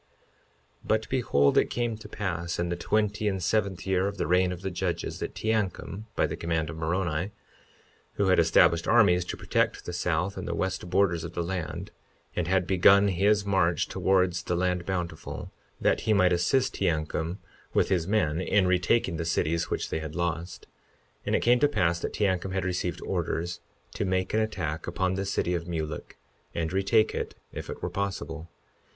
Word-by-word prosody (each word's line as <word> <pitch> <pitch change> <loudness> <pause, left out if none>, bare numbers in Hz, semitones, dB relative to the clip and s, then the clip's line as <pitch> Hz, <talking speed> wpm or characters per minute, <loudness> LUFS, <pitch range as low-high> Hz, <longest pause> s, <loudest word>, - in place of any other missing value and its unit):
52:15 - - -39 0.8
But 110 0 +1
behold, 70 - +2
it - - +1
came 120 -2 -1
to 110 - -11
pass 85 -4 -3
in 85 0 -1
the 85 - -1
twenty 105 +3 0
and 95 -2 +1
seventh 100 -3 0
year 95 0 +1
of 100 0 -4
the - - -1
reign 90 +3 +3
of 90 +1 -7
the 95 - -2
judges, 90 0 -3
that - - -5
Teancum, 105 -1 -2
by - - +3
the - - -3
command 80 -2 -1
of 80 - -8
Moroni—who 85 +3 -4
had 95 -1 +4
established 85 0 +4
armies 100 -7 +5
to - - -5
protect - - 0
the 90 - -5
south 90 +2 -1
and - - -5
the - - -2
west 95 -1 -2
borders 90 -3 +2
of 85 0 -6
the 85 - -1
land, 85 +1 -4 0.4
and 90 -2 -1
had 95 0 +2
begun 95 +2 +5
his 100 +3 +2
march 90 -5 +2
towards 90 -2 +1
the 85 - -2
land 90 0 0
Bountiful, 90 -4 -4 0.3
that - - +2
he 110 - +1
might 95 -3 +4
assist 90 +10 +2
Teancum 80 0 -1 0.4
with - - +3
his 90 -3 +1
men 90 -6 +1
in 100 0 +2
retaking 90 0 +2
the 85 - -2
cities 85 0 0
which - - -2
they - - -1
had 80 -1 -6
lost— 85 0 -3 0.6
52:16 - - -15
And - - +2
it - - +1
came 120 +1 +4
to 145 - +5
pass 90 -11 +1
that - - -4
Teancum 95 -2 0
had 95 -1 -1
received 90 -1 -2
orders 85 -1 -2 0.3
to - - -2
make 95 0 0
an 110 - +3
attack 85 -8 -2
upon 95 +2 0
the 95 +1 -2
city 95 -2 0
of 85 -1 -3
Mulek, 80 -3 -5 0.4
and 80 +1 -2
retake 105 +3 +3
it - - -4 0.2
if - - -6
it - - -7
were - - -1
possible. 85 -5 -4
90 Hz, 190 wpm, -27 LUFS, 85-100 Hz, 0.8 s, armies